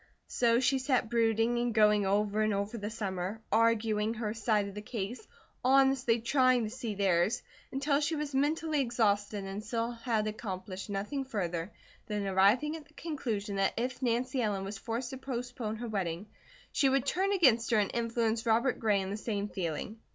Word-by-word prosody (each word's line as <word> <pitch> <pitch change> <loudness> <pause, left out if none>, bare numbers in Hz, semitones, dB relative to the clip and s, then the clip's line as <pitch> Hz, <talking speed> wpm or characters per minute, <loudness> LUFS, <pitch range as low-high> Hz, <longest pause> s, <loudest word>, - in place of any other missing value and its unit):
So 235 -1 +2
she 265 +1 +2
sat 255 -3 0
brooding 230 0 +2
and 240 -1 -1
going 210 -2 +4
over 205 +2 +1
and 215 -1 +2
over 200 +3 -2
the 210 -2 -4
summer, 195 -2 -3
arguing 225 -1 +2
her 215 -2 -2
side 215 -2 +1
of 200 - -8
the 210 - -6
case, 220 - -5 0.4
honestly 265 -2 +4
trying 255 0 +3
to 215 - -3
see 235 -4 -4
theirs, 195 +2 +2 0.3
until 280 +1 +1
she 305 +2 0
was 295 -2 -3
mentally 300 +2 +1
exhausted 210 -4 0
and 195 +2 -5
still 230 +1 -2
had 230 -2 -1
accomplished 195 -2 -5
nothing 210 +8 -2
further 180 -7 -3 0.4
than 210 -1 -2
arriving 200 +11 +3
at 310 -2 -10
the 305 - -26
conclusion 225 -11 -3
that 195 0 +1
if 250 +2 -2
Nancy 250 +1 0
Ellen 205 -4 -1
was 195 +1 -6
forced 235 +2 -3
to 265 - -5
postpone 245 -3 -4
her 235 +2 -5
wedding 190 -4 -2 0.5
she 275 - +3
would 270 -1 +2
turn 380 +7 +1
against 255 - +4
her 230 - +3
and 205 -2 +1
influence 230 -1 0
Robert 235 +3 +2
Gray 210 -3 +2
in 190 0 -4
the 205 - -3
same 210 -2 -3
feeling. 190 +5 -4
225 Hz, 180 wpm, -31 LUFS, 205-255 Hz, 0.5 s, going